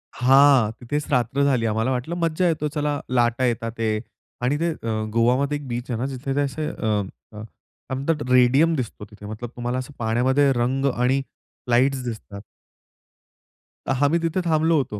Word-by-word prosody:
हां, 130 -3 +5
तिथेच 145 +5 -3
रात्र 125 +2 +1
झाली. 125 -5 +2
आम्हाला 110 +4 0
वाटलं 130 +7 -2
मज्जा 165 +1 +1
येतो. 155 -2 0
चला 150 -1 -2
लाटा 120 0 +2
येत 120 -1 -1
आहे 115 -2 -1 0.4
आणि 135 +4 +1
ते 170 0 +1
अ, 110 -7 -3
गोवामध्ये 130 +5 +2
एक 145 -2 -10
बीच 120 +2 -4
आहे 115 - -2
ना 130 - -1
जिथे 135 0 -4
ते 145 - +2
असे 145 +2 -2
अ, - - -3 0.6
अ, 105 0 -9 0.5
काय 130 - -2
म्हणतात 145 0 -2
रेडियम 135 +6 +5
दिसतो 115 -5 -5
तिथे. 105 -1 -14
मतलब 110 +3 -6
तुम्हाला 120 +1 -2
असं 130 +3 -7
पाण्यामध्ये 130 +5 +2
रंग 130 +3 0
आणि 130 +3 +1 0.5
लाईट्स 130 +2 +2
दिसतात. 110 -4 -7 1.5
अ, - - +1
आम्ही 165 +4 +2
तिथे 165 +3 0
थांबलो 160 0 +3
होतो. 110 -7 -2
130 Hz, 170 wpm, -23 LUFS, 120-145 Hz, 1.5 s, हां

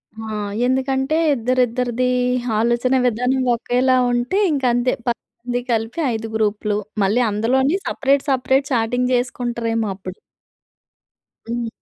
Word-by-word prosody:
ఆ! 220 0 -7 0.4
ఎందుకంటే 265 +3 0 0.2
ఇద్దరి, 255 +1 +1
ఇద్దరిది 250 +1 -1 0.5
ఆలోచనా 240 +3 +2
విధానం 250 +3 0
ఒకేలా 250 +2 +1 0.2
ఉంటే 245 +10 0
ఇంక 280 -3 -1
అంతే, 245 +1 +1 0.2
10 235 - -1 0.2
మంది 245 0 -2
కలిపి, 225 +6 -1
5 225 0 -4
గ్రూప్‌లు. 210 -1 0 0.3
మళ్ళీ 215 +6 +2
అందులోని 260 - +1
సెపరేట్, 275 0 +1
సెపరేట్ 265 +1 +2
చాటింగ్ 245 +2 +1
చేసుకుంటారేమో 235 -3 -1
అప్పుడు. 185 -1 -9 1.3
హ్మ్. 235 0 -2
245 Hz, 115 wpm, -20 LUFS, 225-260 Hz, 1.3 s, ఆలోచనా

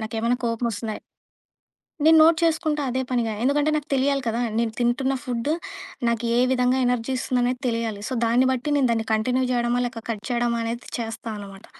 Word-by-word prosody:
నాకేమైనా 225 +2 -1
కోపం 230 +1 -1
ఒస్తుందా? 215 0 -4 1.1
నేను 320 +1 +7
నోట్ 320 0 +5
చేసుకుంటా 315 -2 +1
అదే 260 +1 -1
పనిగా 235 -3 0
ఎందుకంటే 290 +3 +2
నాకు 300 0 -4
తెలియాలి 275 +1 +1
కదా! 230 +1 -1 0.2
నేను 230 -1 0
తింటున్న 260 +3 +1
ఫుడ్డు 250 +3 -1 0.6
నాకు 235 0 -1
ఏ - - +4
విధంగా 250 0 +2
ఎనర్జీస్తుందనేది 250 0 0
తెలియాలి. 230 -3 -2
సో - - -5
దాన్ని 245 +3 +3
బట్టి 260 +3 -2
నేను 270 -3 +3
దాన్ని 225 -1 -1
కంటిన్యూ 250 +4 +1
చేయడమా 240 0 +1
లేక 235 -2 -7
కట్ 210 -2 -4
చేయడమా 235 -1 0
అనేది 235 +1 -5
చేస్తానమాట. 215 -3 -6
240 Hz, 165 wpm, -24 LUFS, 230-260 Hz, 1.1 s, నేను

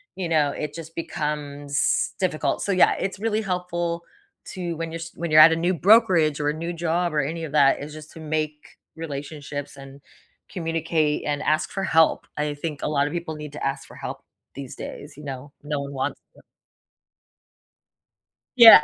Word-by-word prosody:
you 180 -3 -3
know, 150 -3 +3
it 150 0 -4
just 165 -1 -9
becomes 145 -3 -1
difficult. 155 -6 0
So, 200 - -1
yeah, 185 - +5
it's 195 0 -3
really 220 0 0
helpful 175 -3 -2 0.5
to 175 -3 -4
when 165 -1 -4
you're 165 - -4
s 165 - -7
when 170 -1 -3
you're 155 0 +8
at 165 +1 +10
a - - +3
new 175 +3 +1
brokerage 175 - +5
or 145 - 0
a - - 0
new 170 +2 -4
job 170 0 0
or 150 - +2
any 165 +4 -2
of 150 - -5
that 140 -1 +4
is 150 - -7
just 155 0 -10
to 160 - -10
make 155 -1 -3 0.2
relationships 145 -2 -6
and 135 0 -12 0.5
communicate 165 -3 0
and 145 0 -1
ask 155 0 +1
for 195 - -3
help. 160 -3 +3
I 150 0 -1
think 145 -1 -5
a - - -1
lot 145 -1 +2
of 150 - -5
people 165 -2 -4
need 150 -1 -7
to 150 - -4
ask 135 0 -2
for - - -14
help - - -6 0.3
these 135 -2 -7
days. 145 0 -8
You 150 - -10
know, 135 +1 -7
no 145 -1 -2
one 140 0 -6
wants 130 - -3 0.2
to. - - -16 2.2
Yeah. 225 -10 +11
155 Hz, 190 wpm, -24 LUFS, 145-170 Hz, 2.2 s, Yeah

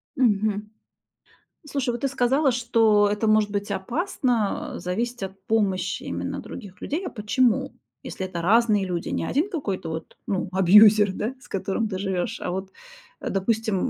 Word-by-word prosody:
Мгм. 210 -4 +1 1.0
Слушай, 270 -3 -1
вот 240 - -5
ты 275 - +1
сказала, 270 +2 +2
что 225 -4 +3
это 210 +1 0
может 215 -1 +3
быть 205 0 -2
опасно, 240 - -1
а, - - -6
зависеть 230 +5 -3
от 190 0 -7
помощи 190 -4 0
именно - - -4
других 200 -7 -10
людей. 325 +7 -3
А - - -3
почему? 225 +2 +1 0.3
Если 190 - -5
это 175 -2 -5
разные 210 +1 +3
люди. 175 -2 -3
Не - - -2
1 315 +9 0
какой-то 200 - -3
вот, 160 0 -7
ну, 190 -3 -1
абьюзер, 205 +2 +7
да, 230 +7 -3
с - - -17
которым 200 +3 -2
ты 190 - -3
живешь, 190 -3 -2
а - - -4
вот, 190 +1 -4 0.5
а - - -4
допустим, 215 +2 0
210 Hz, 165 wpm, -24 LUFS, 190-240 Hz, 1.0 s, абьюзер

